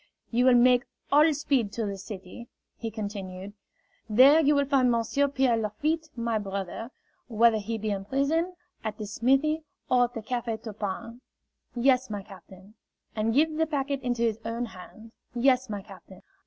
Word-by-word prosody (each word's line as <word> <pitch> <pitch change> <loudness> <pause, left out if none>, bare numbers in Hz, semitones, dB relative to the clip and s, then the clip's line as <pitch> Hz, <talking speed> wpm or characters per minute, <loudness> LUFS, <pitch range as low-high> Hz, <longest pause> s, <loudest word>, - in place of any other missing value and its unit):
"You 245 +2 +2
will 255 -1 +6
make 250 +1 +5 0.3
all 300 +3 +6
speed 275 -7 0
to 230 - -2
the 200 -1 -3
city," 195 +3 -9 0.3
he 230 - -5
continued. 200 -3 -6 0.6
"There 265 +8 +7
you 295 -1 +4
will 285 0 +2
find 265 -2 +3
Monsieur 235 +4 +1
Pierre 265 -3 +2
Lafitte, 300 +10 -2
my 230 -2 -1
brother 200 +2 -5 0.4
whether 230 -1 +4
he 225 +2 -3
be 215 0 -2
in 195 -1 -3
prison, 315 - 0 0.3
at 215 -1 -4
the 215 - -5
smithy, 270 +9 +1 0.3
or 250 -1 +5
at 245 - -9
the 225 - -5
Cafe 235 -1 -2
Turpin 220 +2 -6 0.3
" - - -57 0.2
"Yes, 255 +1 +3
my 205 -2 -4
captain." 190 0 -15 0.4
"And 220 +1 0
give 310 +5 +2
the 320 0 +2
packet 280 -2 -2
into 245 -2 -1
his 225 -2 0
own 230 +2 -3
hand 220 +2 -12
" - - -45
"Yes, 255 0 +3
my 205 -2 -4
captain." 190 -1 -14
235 Hz, 175 wpm, -27 LUFS, 210-270 Hz, 0.6 s, There